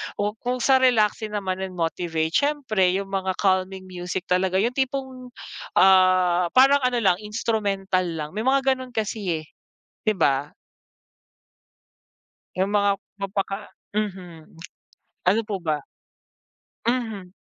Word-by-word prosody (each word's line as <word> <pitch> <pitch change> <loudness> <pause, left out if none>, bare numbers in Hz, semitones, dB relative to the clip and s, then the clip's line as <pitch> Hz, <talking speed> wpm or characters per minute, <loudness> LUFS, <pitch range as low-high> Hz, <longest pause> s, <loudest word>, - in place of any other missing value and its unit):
O 205 +1 -1
kung 250 0 -2
sa 265 -1 +5
relaxing 220 -4 +2
naman 190 -2 -2
yun 190 -1 -5
motivate 165 -1 -1
siyempre 230 -11 +2
yung 195 0 -3
mga 190 -1 -1
calming 190 -1 +1
music 180 0 -4
talaga, 185 +1 +1
yung 240 +5 -1
tipong, 260 -2 -3 0.4
ah, 185 -2 +5
parang 270 +2 +6
ano 250 -1 +1
lang 185 -4 +3
instrumental 205 -3 -1
lang. 165 - -5 0.2
May 215 - -2
mga 270 0 +3
ganon 255 -1 -9
kasi, 205 -6 -2
eh. - - -17 0.6
Di 215 - +2
ba? 140 -2 +1 2.1
Yung 190 +2 0
mga 205 -1 +3 0.3
mapaka 195 +1 -3 0.2
mhm. 180 -7 -5 0.7
Ano 200 +5 +4
po 205 -3 -2
ba? 155 -3 -1 1.1
Mhm. 220 -7 -2
195 Hz, 125 wpm, -24 LUFS, 185-230 Hz, 2.1 s, parang